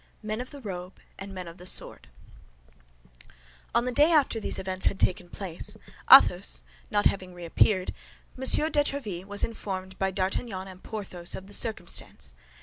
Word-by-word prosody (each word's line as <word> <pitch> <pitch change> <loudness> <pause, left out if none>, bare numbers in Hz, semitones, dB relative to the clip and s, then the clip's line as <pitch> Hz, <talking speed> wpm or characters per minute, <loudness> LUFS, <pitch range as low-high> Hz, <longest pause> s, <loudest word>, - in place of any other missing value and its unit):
MEN 215 +2 -3
OF 255 - -7
THE 285 -2 -11
ROBE 185 -4 -7 0.2
AND 195 +1 -7
MEN 185 -2 -7
OF 170 +1 -10
THE 180 - -6
SWORD 60 - +1 1.7
On 240 - +3
the 250 - -1
day 295 +6 +4
after 290 -7 +3
these - - -4
events 185 0 -1
had 195 - 0
taken 180 -1 0
place, 180 -4 -6 0.3
Athos - - +7 0.3
not 205 0 +1
having 185 -2 0
reappeared, 180 +2 +1 0.4
M. 265 - -7
de 300 +2 +4
Tréville 215 -12 -3
was 205 0 -1
informed 190 -4 -5
by 195 - +1
D'Artagnan 190 +1 -2
and 185 -1 -11
Porthos 185 -5 -4
of 190 - -8
the 200 - -9
circumstance. 220 +1 0
195 Hz, 160 wpm, -27 LUFS, 185-225 Hz, 1.7 s, Athos